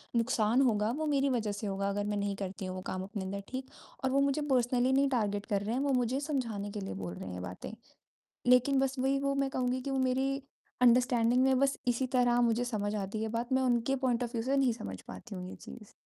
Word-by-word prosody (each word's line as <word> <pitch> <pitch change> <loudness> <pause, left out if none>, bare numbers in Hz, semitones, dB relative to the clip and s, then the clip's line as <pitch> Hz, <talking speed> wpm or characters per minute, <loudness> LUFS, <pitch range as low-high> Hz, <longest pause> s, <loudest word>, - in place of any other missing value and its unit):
नुकसान 230 0 +2
होगा 220 -4 +2
वो 315 - -1
मेरी 280 -1 +2
वजह 225 -5 0
से 205 +1 -4
होगा 195 0 -1
अगर 205 +1 -1
मैं 205 0 -1
नहीं 200 0 -1
करती 195 0 -5
हूँ 185 - -4
वो 185 - -5
काम 185 0 -3
अपने 200 0 -5
अंदर, 200 +1 -4
ठीक। 260 0 -4 0.4
और 260 - +2
वो 275 +1 +3
मुझे 280 +2 +1
पर्सनली 250 0 +3
नहीं 275 0 +3
टार्गेट 205 -5 0
कर 200 -1 0
रहे 215 +3 -2
हैं, 265 - 0
वो 280 -1 +1
मुझे 250 +2 +1
समझाने 235 -9 -3
के 210 - -5
लिए 195 - -5
बोल 90 -2 -5
रहे 95 - -7
हैं 90 - -6
ये - - -5
बातें। 90 - -7 0.8
लेकिन 250 +2 +5
बस 270 0 0
वही 270 +1 +2
वो 275 0 0
मैं 275 -1 0
कहूँगी 255 0 -1
कि 275 - -4
वो 270 - 0
मेरी 260 +1 +1 0.5
अंडरस्टैंडिंग 245 0 +4
में 265 -1 +4
बस 275 0 +2
इसी 245 +2 +1
तरह 245 -1 +4
मुझे 235 0 +2
समझ 215 -3 -2
आती 205 +1 -3
है 220 - -1
बात, 235 +3 -3
मैं 260 0 +3
उनके 250 +2 +2
पॉइंट 250 -2 0
ऑफ 240 - -5
व्यू 225 - 0
से 270 +3 +1
नहीं 265 -3 +3
समझ 95 - -7
पाती 95 - -9
हूँ 180 0 -6
ये - - -9
चीज़। 215 -4 -12
240 Hz, 250 wpm, -31 LUFS, 205-265 Hz, 0.8 s, लेकिन